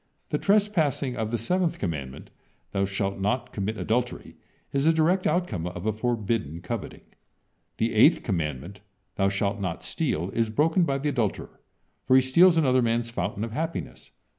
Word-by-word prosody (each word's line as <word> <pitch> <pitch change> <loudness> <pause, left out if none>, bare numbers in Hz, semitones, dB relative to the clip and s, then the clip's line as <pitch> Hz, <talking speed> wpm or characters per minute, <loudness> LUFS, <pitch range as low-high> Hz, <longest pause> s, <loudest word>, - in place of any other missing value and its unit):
The - - -1
trespassing 175 -11 +1
of 110 -1 -2
the 120 - -1
seventh 175 - 0
commandment: 70 -8 -5 0.4
"Thou 100 0 +1
shalt 100 0 -2
not 120 +5 -1
commit 105 +2 -3
adultery," 120 +3 -2 0.4
is 140 +1 +1
the 165 - +6
direct 165 +4 +2
outcome 110 - -1
of 90 +1 -6
a 110 - +1
forbidden 110 - -2
coveting. 100 +3 -6 0.7
The 115 +1 0
eighth 120 +9 +5
commandment: 85 - -3 0.4
"Thou 95 0 +3
shalt 100 +1 -1
not 90 -4 -4
steal," 85 +5 -2
is 115 +1 0
broken 160 +9 +2
by 135 -3 0
the 145 +2 -1
adulterer, 120 -7 -2 0.5
for 130 - +5
he 130 - +7
steals 165 +7 +5
another 130 -5 +3
man's 115 0 0
fountain 100 0 -3
of 115 - -4
happiness. 160 +7 -5
115 Hz, 165 wpm, -26 LUFS, 100-145 Hz, 0.7 s, he